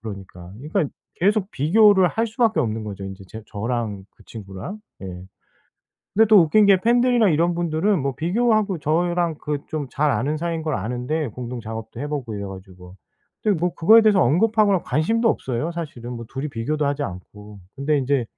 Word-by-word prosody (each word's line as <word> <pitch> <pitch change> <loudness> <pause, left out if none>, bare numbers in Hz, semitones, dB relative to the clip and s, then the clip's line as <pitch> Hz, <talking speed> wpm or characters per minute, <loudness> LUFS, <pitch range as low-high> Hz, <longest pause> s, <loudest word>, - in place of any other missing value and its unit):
그러니까. 95 -4 -9
그러니까 160 +5 -1 0.3
계속 200 +2 +1
비교를 190 +5 +4
할 225 +6 0
수밖에 225 -7 +1
없는 110 -3 -2
거죠 100 -2 -7
인제 95 0 -8
제 110 0 -9
저랑 110 -2 -3
그 - - -19
친구랑. 105 - -8 0.2
예. 95 - -6 1.1
근데 225 +2 +5
또 215 -2 +7
웃긴 175 +6 +4
게 195 -2 +6
팬들이나 240 -1 +3
이런 170 +2 +2
분들은 170 +3 0
뭐 135 0 -2
비교하고 205 - +1
저랑 170 +2 0
그 150 -1 -2
좀 150 -3 -4
잘 150 0 +1
아는 140 +8 -1
사이인 165 0 -3
걸 155 -3 -2
아는데 125 +6 -2
공동 120 +1 -6
작업도 110 +1 -7
해 145 - -3
보고 140 -6 -4
이래 100 -1 -5
가지고. 95 -1 -11 0.5
근데 205 -5 +1
뭐 180 0 0
그거에 220 +8 +6
대해서 210 -4 +4
언급하거나 205 - +3
관심도 225 +9 +1
없어요 130 - -2
사실은 130 -8 -6
뭐 115 -1 -7
둘이 135 +3 -3
비교도 145 +5 -2
하지 145 +1 -1
않고. 105 0 -9 0.2
근데 145 +2 +1
인제 135 -2 0
150 Hz, 375 characters per minute, -22 LUFS, 115-190 Hz, 1.1 s, 또